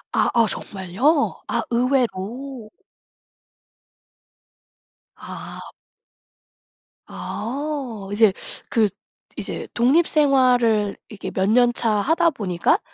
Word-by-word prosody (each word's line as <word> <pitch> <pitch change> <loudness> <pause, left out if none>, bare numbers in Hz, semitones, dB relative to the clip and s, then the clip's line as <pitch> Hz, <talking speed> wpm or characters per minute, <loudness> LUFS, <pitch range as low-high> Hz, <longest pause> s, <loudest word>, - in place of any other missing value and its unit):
아아. 230 -1 +3
정말요? 200 - 0
아 - - -1
의외로. 245 -1 -1 2.5
아. - - -9 1.3
아어. 250 -4 -5
이제 210 -1 +5 0.4
그 220 -3 +3 0.5
이제 - - -4
독립 275 +8 +3
생활을 245 -8 +3
이렇게 210 - -7
몇 190 +1 0
년차 240 0 +3
하다 320 - +3
보니까 185 - +1
235 Hz, 155 characters per minute, -22 LUFS, 210-275 Hz, 2.5 s, 이제